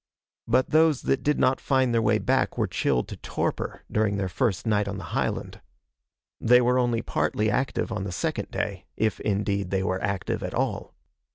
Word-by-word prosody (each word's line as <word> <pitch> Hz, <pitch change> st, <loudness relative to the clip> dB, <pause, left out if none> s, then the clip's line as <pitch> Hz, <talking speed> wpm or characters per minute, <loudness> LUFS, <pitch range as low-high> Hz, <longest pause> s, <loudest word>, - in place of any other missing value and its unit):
But 125 Hz, +3 st, +2 dB
those 155 Hz, -3 st, +4 dB
that 135 Hz, -, +1 dB
did 150 Hz, 0 st, +1 dB
not 130 Hz, -, +2 dB
find 130 Hz, -3 st, +2 dB
their 115 Hz, -, +3 dB
way -, -, +3 dB
back -, -, 0 dB
were -, -, +2 dB
chilled 60 Hz, -2 st, 0 dB
to -, -, -7 dB
torpor -, -, -3 dB
during 105 Hz, -2 st, +1 dB
their 95 Hz, -1 st, -1 dB
first 95 Hz, +4 st, -1 dB
night 105 Hz, -2 st, +1 dB
on 100 Hz, 0 st, -4 dB
the 95 Hz, -, -7 dB
highland. -, -, -2 dB, 0.8 s
They 125 Hz, +2 st, +6 dB
were 125 Hz, +1 st, +3 dB
only 120 Hz, -2 st, +1 dB
partly 105 Hz, 0 st, 0 dB
active 130 Hz, +1 st, -1 dB
on 105 Hz, -3 st, -2 dB
the 100 Hz, -, -4 dB
second 95 Hz, -, -2 dB
day -, -, -4 dB
if, 110 Hz, -1 st, 0 dB
indeed, 100 Hz, -2 st, -1 dB
they 95 Hz, 0 st, 0 dB
were 95 Hz, -1 st, -1 dB
active 100 Hz, -2 st, -2 dB
at -, -, -4 dB
all. -, -, -2 dB
110 Hz, 190 wpm, -26 LUFS, 100-125 Hz, 0.8 s, They